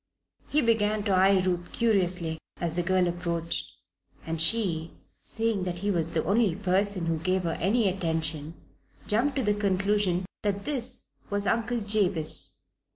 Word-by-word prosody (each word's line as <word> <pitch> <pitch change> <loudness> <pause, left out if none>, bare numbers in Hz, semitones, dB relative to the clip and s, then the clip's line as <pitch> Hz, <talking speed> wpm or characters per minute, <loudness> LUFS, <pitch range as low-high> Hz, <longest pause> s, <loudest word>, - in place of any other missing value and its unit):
He 300 - +2
began 215 -3 +2
to 205 - 0
eye 190 0 +4
Ruth 175 -1 -1
curiously 180 -7 +1 0.2
as 170 -2 -2
the 175 - +1
girl 185 +1 +2
approached, 170 -1 -2 0.6
and 165 0 -1
she, 170 -4 +1 0.3
seeing 225 - 0
that 175 -1 -3
he 205 - +2
was 165 -2 0
the 160 - +2
only 200 -2 +2
person 195 -1 0
who 165 -1 0
gave 185 +3 0
her 165 -1 -1
any 210 +4 +2
attention, 160 -4 -2 0.5
jumped 240 +7 +1
to 265 - 0
the 210 -1 +2
conclusion 200 -2 +1 0.2
that 200 -2 -2
this 255 - +1 0.2
was 205 0 +1
Uncle 235 +2 0
Jabez. 200 -6 -1
190 Hz, 155 wpm, -27 LUFS, 170-210 Hz, 0.6 s, eye